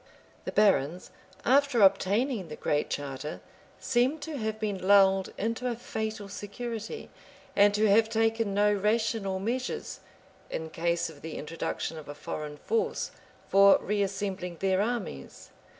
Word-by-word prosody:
The -, -, -3 dB
barons, 180 Hz, -5 st, +2 dB, 0.3 s
after 270 Hz, -3 st, +4 dB
obtaining 200 Hz, +3 st, +3 dB
the 150 Hz, -, -7 dB
Great 150 Hz, 0 st, -1 dB
Charter, 145 Hz, +1 st, -4 dB, 0.4 s
seem 255 Hz, +4 st, +1 dB
to 305 Hz, +1 st, -5 dB
have 220 Hz, -1 st, -3 dB
been 200 Hz, -4 st, -3 dB
lulled 195 Hz, -1 st, +5 dB
into 230 Hz, +4 st, -2 dB
a 240 Hz, -, -2 dB
fatal 220 Hz, -2 st, -4 dB
security, 220 Hz, -, -6 dB, 0.4 s
and 205 Hz, +1 st, +6 dB
to 215 Hz, +1 st, +3 dB
have 220 Hz, +2 st, +4 dB
taken 225 Hz, -2 st, +1 dB
no 210 Hz, +1 st, +4 dB
rational 210 Hz, -1 st, 0 dB
measures, 240 Hz, +6 st, -3 dB, 0.5 s
in 160 Hz, 0 st, -5 dB
case 170 Hz, +1 st, 0 dB
of 145 Hz, -, -16 dB
the 160 Hz, -1 st, -6 dB
introduction 165 Hz, +1 st, -4 dB
of 145 Hz, -, -12 dB
a 145 Hz, -, -6 dB
foreign 150 Hz, 0 st, -6 dB
force, 450 Hz, -, -1 dB, 0.4 s
for 195 Hz, 0 st, +7 dB
reassembling 195 Hz, -3 st, -2 dB
their 190 Hz, 0 st, +2 dB
armies. 210 Hz, -, -4 dB
205 Hz, 135 wpm, -29 LUFS, 185-225 Hz, 0.5 s, for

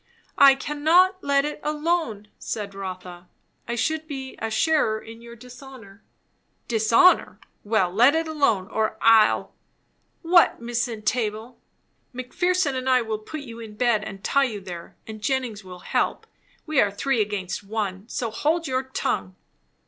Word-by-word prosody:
"I 275 Hz, -1 st, +8 dB
cannot 325 Hz, +7 st, +2 dB
let 280 Hz, 0 st, +2 dB
it 300 Hz, -, -5 dB
alone," 300 Hz, -9 st, -2 dB
said 205 Hz, -2 st, -5 dB
Rotha. 185 Hz, -2 st, -8 dB, 0.4 s
"I 235 Hz, -, -2 dB
should 315 Hz, +6 st, -1 dB
be 265 Hz, -3 st, -7 dB
a 225 Hz, -, -3 dB
sharer 220 Hz, -2 st, +1 dB
in 225 Hz, +1 st, -12 dB
your 235 Hz, 0 st, -11 dB
dishonour." 245 Hz, -4 st, -13 dB, 0.7 s
"Dishonour! 230 Hz, +10 st, +3 dB, 0.2 s
well, 205 Hz, -4 st, +1 dB
let 245 Hz, +8 st, +5 dB
it 325 Hz, 0 st, 0 dB
alone, 275 Hz, -12 st, +1 dB
or 220 Hz, -1 st, -1 dB
I'll 225 Hz, -1 st, +4 dB, 0.4 s
" -, -, -45 dB
"What, 345 Hz, -, +6 dB
Miss 240 Hz, +1 st, -2 dB
Entable?" 225 Hz, +1 st, -3 dB, 0.6 s
"Mc 255 Hz, 0 st, -8 dB
Pherson 360 Hz, -5 st, +1 dB
and 260 Hz, 0 st, -2 dB
I 255 Hz, -2 st, +4 dB
will 220 Hz, -1 st, -3 dB
put 300 Hz, +8 st, -8 dB
you 235 Hz, -4 st, -10 dB
in 220 Hz, -2 st, -10 dB
bed 230 Hz, -2 st, +1 dB
and 195 Hz, -2 st, -9 dB
tie 275 Hz, 0 st, +2 dB
you 220 Hz, -5 st, -4 dB
there; 175 Hz, -3 st, -9 dB
and 215 Hz, -1 st, -9 dB
Jennings 240 Hz, -3 st, -2 dB
will 180 Hz, -1 st, -11 dB
help. -, -, 0 dB, 0.4 s
We 310 Hz, -3 st, +2 dB
are 205 Hz, -, +2 dB
three 230 Hz, +4 st, 0 dB
against 205 Hz, -3 st, -3 dB
one. 205 Hz, 0 st, -4 dB
So 230 Hz, -3 st, -3 dB
hold 325 Hz, +7 st, 0 dB
your 260 Hz, -1 st, 0 dB
tongue." 100 Hz, -, -3 dB
235 Hz, 155 wpm, -24 LUFS, 210-280 Hz, 0.7 s, I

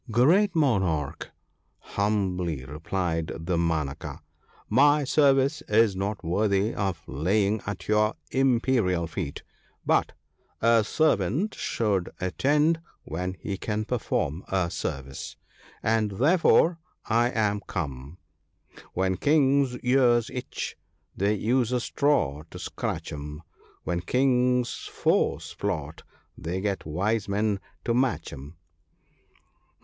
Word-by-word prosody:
' 120 Hz, -, -10 dB
Great 170 Hz, -, +4 dB
Monarch! 95 Hz, -, 0 dB, 0.3 s
' -, -, -45 dB
humbly 90 Hz, -8 st, -1 dB
replied 80 Hz, +3 st, -2 dB
Damanaka, 80 Hz, -4 st, -2 dB, 0.3 s
' -, -, -30 dB
my 145 Hz, +6 st, +4 dB
service 140 Hz, +1 st, +3 dB
is 105 Hz, -2 st, +4 dB
not 100 Hz, +1 st, -3 dB
worthy 100 Hz, +4 st, +1 dB
of 95 Hz, -6 st, -2 dB
laying 100 Hz, -, +1 dB
at 100 Hz, -, -5 dB
your 105 Hz, 0 st, +2 dB, 0.2 s
imperial 120 Hz, -9 st, +2 dB
feet, 80 Hz, -2 st, -5 dB, 0.4 s
but -, -, +2 dB, 0.5 s
a 115 Hz, -1 st, +4 dB
servant 155 Hz, -, +1 dB
should 100 Hz, -6 st, -1 dB
attend 150 Hz, -, +2 dB, 0.2 s
when 90 Hz, +4 st, -4 dB
he 100 Hz, -2 st, -4 dB
can 110 Hz, +1 st, -2 dB
perform 100 Hz, -, -1 dB
a 90 Hz, -3 st, 0 dB
service, 70 Hz, 0 st, -5 dB, 0.5 s
and 110 Hz, -1 st, +2 dB
therefore 165 Hz, -, +4 dB, 0.3 s
I 120 Hz, +2 st, +2 dB
am 105 Hz, -4 st, 0 dB
come, 70 Hz, -3 st, -5 dB, 0.2 s
— -, -, -46 dB
" -, -, -19 dB
When 95 Hz, 0 st, +1 dB
Kings' 140 Hz, -, +3 dB
ears 125 Hz, -2 st, +3 dB
itch, 125 Hz, -, -5 dB, 0.4 s
they 100 Hz, +2 st, +1 dB
use 120 Hz, +4 st, +1 dB
a 125 Hz, -, +1 dB
straw 120 Hz, -, +1 dB
to -, -, -9 dB
scratch -, -, -4 dB
'em; 75 Hz, +2 st, -7 dB, 0.4 s
When 85 Hz, -1 st, -1 dB
Kings' 125 Hz, +2 st, +1 dB
foes -, -, 0 dB
plot, 80 Hz, -7 st, -3 dB, 0.3 s
they 85 Hz, +3 st, -4 dB
get 100 Hz, -4 st, -2 dB
wise 100 Hz, +6 st, -1 dB
men 100 Hz, 0 st, 0 dB, 0.3 s
to 115 Hz, -, +1 dB
match 120 Hz, -, 0 dB
'em." 70 Hz, +4 st, -10 dB
105 Hz, 120 wpm, -26 LUFS, 85-125 Hz, 0.5 s, Great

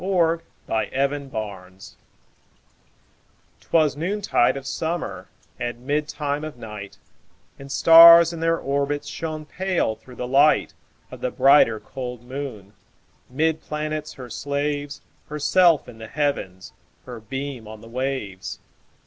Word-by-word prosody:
1827 135 Hz, +5 st, 0 dB
Evening -, -, -14 dB, 0.5 s
Star -, -, -14 dB, 1.6 s
'Twas 155 Hz, -4 st, +1 dB
noontide 175 Hz, -6 st, +1 dB
of 135 Hz, -, -8 dB
summer, 165 Hz, +5 st, -4 dB, 0.3 s
And 120 Hz, +1 st, -5 dB
midtime 150 Hz, 0 st, -2 dB
of 155 Hz, -5 st, -7 dB
night, 105 Hz, -4 st, -9 dB, 0.6 s
And 140 Hz, 0 st, -10 dB
stars, 170 Hz, +2 st, +9 dB
in 165 Hz, -, -6 dB
their 165 Hz, 0 st, +1 dB
orbits, 140 Hz, +1 st, -2 dB
Shone 155 Hz, 0 st, -5 dB
pale, 180 Hz, -9 st, -1 dB
through 125 Hz, +3 st, -15 dB
the 125 Hz, -, -5 dB
light 140 Hz, +4 st, +3 dB, 0.4 s
Of -, -, -10 dB
the 125 Hz, -, 0 dB
brighter, 130 Hz, -4 st, +5 dB
cold 125 Hz, -1 st, -7 dB
moon. 125 Hz, -6 st, -7 dB, 0.6 s
'Mid 160 Hz, +4 st, 0 dB
planets 155 Hz, 0 st, -4 dB
her 125 Hz, -3 st, -10 dB
slaves, 145 Hz, +1 st, -3 dB, 0.3 s
Herself 155 Hz, +2 st, +3 dB
in 115 Hz, -2 st, -12 dB
the 110 Hz, -, -8 dB
Heavens, 125 Hz, -11 st, -3 dB, 0.3 s
Her 125 Hz, -2 st, -8 dB
beam 135 Hz, 0 st, -6 dB
on 110 Hz, 0 st, -10 dB
the 115 Hz, -, -13 dB
waves. 125 Hz, -6 st, -4 dB
140 Hz, 125 wpm, -23 LUFS, 125-155 Hz, 1.6 s, stars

